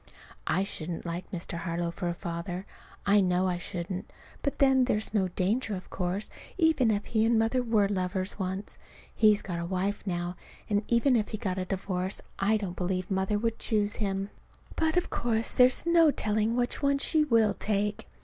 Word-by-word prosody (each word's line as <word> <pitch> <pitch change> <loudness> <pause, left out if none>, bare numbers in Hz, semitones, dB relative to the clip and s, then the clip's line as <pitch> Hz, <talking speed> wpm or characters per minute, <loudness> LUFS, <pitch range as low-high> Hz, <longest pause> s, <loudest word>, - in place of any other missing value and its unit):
I 190 +4 +2
shouldn't 170 -3 -5
like 175 +1 -4
Mr. 170 -1 -4
Harlow 170 0 -2
for 175 +1 -4
a 170 - -1
father. 170 +2 -5 0.4
I 200 0 +5
know 180 0 +2
I 180 -1 -1
shouldn't. 180 +2 -5 0.3
But 280 - -2
then, 265 -2 +5
there's 215 -3 0
no 195 -4 +2
danger, 200 +5 0
of 185 - -9
course, 185 +3 -2 0.3
even 320 -9 +3
if 205 -1 0
he 220 -1 +1
and 230 0 +3
Mother 225 +3 +2
were 225 -4 +2
lovers 185 0 -2
once. 190 +1 -4 0.3
He's 215 -2 +4
got 175 -3 -4
a 170 - -3
wife 190 +3 -1
now, 175 0 -2 0.3
and 205 -1 +1
even 245 +2 +3
if 215 -3 +1
he 215 - -3
got 190 -2 -2
a 185 - -2
divorce, 185 0 -2 0.2
I 210 +3 +3
don't 195 -4 -4
believe 185 +1 -2
Mother 190 +2 +1
would 230 +1 -1
choose 210 -2 0
him. 195 -1 -2 0.4
But 320 +1 +1
of 355 - 0
course 230 -1 0
there's 250 +3 +5
no 335 -2 +6
telling 220 -3 +1
which 245 0 -1
one 280 -1 +3
she 305 +2 +3
will 225 -7 +3
take. 205 0 -1
205 Hz, 190 wpm, -29 LUFS, 185-225 Hz, 0.4 s, no